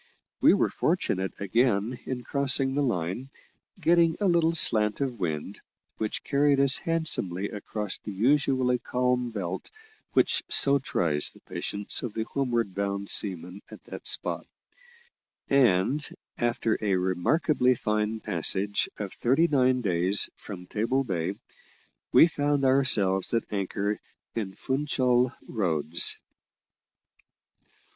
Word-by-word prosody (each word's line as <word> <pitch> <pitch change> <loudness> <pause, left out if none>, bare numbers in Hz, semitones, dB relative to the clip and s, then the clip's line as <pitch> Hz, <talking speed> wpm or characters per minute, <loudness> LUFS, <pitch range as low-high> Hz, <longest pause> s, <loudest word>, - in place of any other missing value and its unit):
We - - +6
were - - +1
fortunate 95 +1 -1
again 115 +3 0
in 125 -2 -4
crossing 135 +1 +2
the 145 - 0
line, 115 - -2 0.5
getting 170 -1 +3
a 205 - 0
little 170 -3 +3
slant 105 -8 +4
of 130 -5 -3
wind, 80 -5 -4 0.4
which 110 -1 -3
carried 140 0 +2
us 140 0 +4
handsomely 100 - -1
across 105 -1 -5
the 105 - -7
usually 130 +3 +1
calm 125 0 -1
belt 95 -5 -5 0.4
which - - +3
so 140 0 +5
tries 80 - -1
the - - -15
patience 100 0 -4
of 120 -4 -6
the 110 - -1
homeward 120 -5 -2
bound 100 0 -3
seaman 90 -1 0
at - - -13
that - - -8
spot; - - 0 1.0
and 135 +2 +2 0.3
after 120 -2 0
a 100 -3 +1
remarkably 125 - +1
fine 105 0 -1
passage 95 +3 0
of 100 -3 -5
thirty 135 +8 +2
nine 130 -4 +2
days 95 -1 +2
from 90 -4 -9
Table 115 +8 -1
Bay, 95 -4 -3 0.8
we - - +8
found 145 -3 0
ourselves 115 -8 +2
at 115 - +1
anchor 100 +1 -2 0.3
in 100 -5 -4
Funchal 130 -3 0 0.2
Roads. 85 -6 0
115 Hz, 120 wpm, -27 LUFS, 95-135 Hz, 1.0 s, we